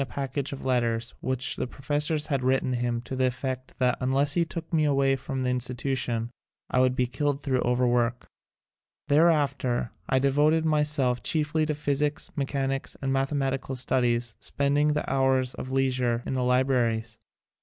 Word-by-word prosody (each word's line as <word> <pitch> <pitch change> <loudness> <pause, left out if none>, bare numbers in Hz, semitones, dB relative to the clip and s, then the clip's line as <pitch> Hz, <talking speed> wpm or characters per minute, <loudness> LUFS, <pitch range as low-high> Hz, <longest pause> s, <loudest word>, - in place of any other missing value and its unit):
(Continued 135 - -4
from 140 - -2
page 135 +1 -4
905) 120 +1 -1
the - - -2
professors 150 +3 -1
had 140 -3 -1
written 130 0 +1
him 120 -1 -1
to 125 +2 -6
the 130 0 +2
effect 130 +1 -4
that 125 -1 +1
unless 135 +3 +2
he 175 - +3
took 165 0 -7
me 155 -2 +3
away 135 -2 +3
from 135 0 -4
the 125 - 0
In 125 - 0
stitution 125 -2 -2 0.4
I 130 - +2
would 130 0 +3
be 125 - +2
killed 145 +2 -2
thru 130 -2 +1
overwork. 120 -1 +1 0.8
Thereafter 140 -6 +2 0.2
I 130 - +3
devoted 145 +4 +3
myself 150 -5 +1
chiefly 155 -1 0
to 150 - -1
phys 145 -1 -1
ics, 150 0 -1
mechanics 135 -2 -2
and 135 -1 -1
mathematical 135 -1 -1
studies, 120 -2 0
spending 145 +2 +1
the 150 - -2
hours 130 -1 +1
of 130 - -7
leisure 130 -3 +1
in - - -3
the 130 -1 0
libra 125 0 +3
ries. 110 -1 -4
135 Hz, 165 wpm, -27 LUFS, 125-145 Hz, 0.8 s, he